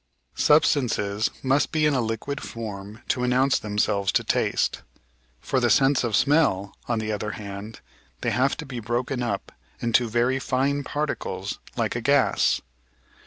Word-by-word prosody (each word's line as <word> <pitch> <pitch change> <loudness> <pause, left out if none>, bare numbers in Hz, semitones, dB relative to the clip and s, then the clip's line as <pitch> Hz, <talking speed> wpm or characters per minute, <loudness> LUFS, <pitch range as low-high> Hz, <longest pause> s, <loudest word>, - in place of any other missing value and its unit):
Substances 120 -9 +2
must 135 +2 +2
be 155 -1 +2
in 150 - +3
a 130 - +2
liquid 115 +6 -3
form 105 0 -7
to 125 - 0
announce 130 +2 +3
themselves 105 -2 0
to - - +1
taste. - - 0 0.6
For 130 - 0
the 120 -1 +2
sense 135 +5 +4
of 115 -3 0
smell, 135 -10 +2
on 120 - 0
the 110 0 -2
other 105 0 -3
hand, 100 +1 -8 0.4
they - - 0
have 135 +3 +1
to 160 - -6
be 130 -3 -6
broken 120 +3 -2
up 100 -5 -3 0.3
into 120 0 +2
very 120 +4 +1
fine 140 +2 0
particles 150 +3 -3 0.2
like - - 0
a - - -2
gas. - - +3
120 Hz, 155 wpm, -25 LUFS, 105-135 Hz, 0.6 s, sense